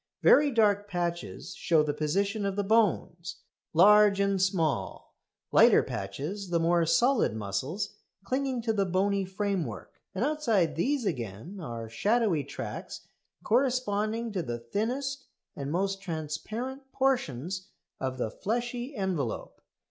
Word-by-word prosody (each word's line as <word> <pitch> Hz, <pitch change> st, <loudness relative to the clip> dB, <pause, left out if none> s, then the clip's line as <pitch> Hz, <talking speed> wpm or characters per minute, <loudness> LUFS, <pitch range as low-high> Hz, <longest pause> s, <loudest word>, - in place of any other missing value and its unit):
Very 290 Hz, 0 st, +6 dB
dark 205 Hz, -4 st, +2 dB
patches 175 Hz, -1 st, -3 dB
show 160 Hz, -3 st, +2 dB
the 150 Hz, -1 st, -1 dB
position 200 Hz, +8 st, 0 dB
of 195 Hz, -1 st, -1 dB
the 205 Hz, -, 0 dB
bones, 185 Hz, -5 st, +1 dB, 0.4 s
large 205 Hz, +3 st, +6 dB
and 200 Hz, -1 st, +2 dB
small; 175 Hz, -6 st, -1 dB, 0.4 s
lighter -, -, +6 dB
patches 150 Hz, -, -5 dB
the 170 Hz, -1 st, +2 dB
more 170 Hz, 0 st, +2 dB
solid 240 Hz, -, +3 dB
muscles 110 Hz, -, -3 dB, 0.3 s
clinging 260 Hz, +1 st, -1 dB
to 225 Hz, -1 st, +1 dB
the 200 Hz, -2 st, +1 dB
bony 195 Hz, +2 st, +1 dB
framework; 185 Hz, -, -3 dB, 0.2 s
and 205 Hz, +7 st, +1 dB
outside 235 Hz, -, +1 dB
these 265 Hz, -, 0 dB
again 125 Hz, -, -4 dB
are 115 Hz, -8 st, -6 dB
shadowy 200 Hz, -, +1 dB
tracts -, -, -7 dB, 0.4 s
corresponding 230 Hz, -2 st, +1 dB
to 190 Hz, -3 st, -1 dB
the 120 Hz, -6 st, -4 dB
thinnest 250 Hz, -, -3 dB, 0.3 s
and 140 Hz, 0 st, -4 dB
most 195 Hz, +3 st, -1 dB
transparent 215 Hz, -, -5 dB
portions 190 Hz, -, -1 dB, 0.3 s
of 130 Hz, -1 st, -3 dB
the 115 Hz, -4 st, -2 dB
fleshy 240 Hz, -, -3 dB
envelope. 180 Hz, -, -3 dB
195 Hz, 125 wpm, -29 LUFS, 160-225 Hz, 0.4 s, Very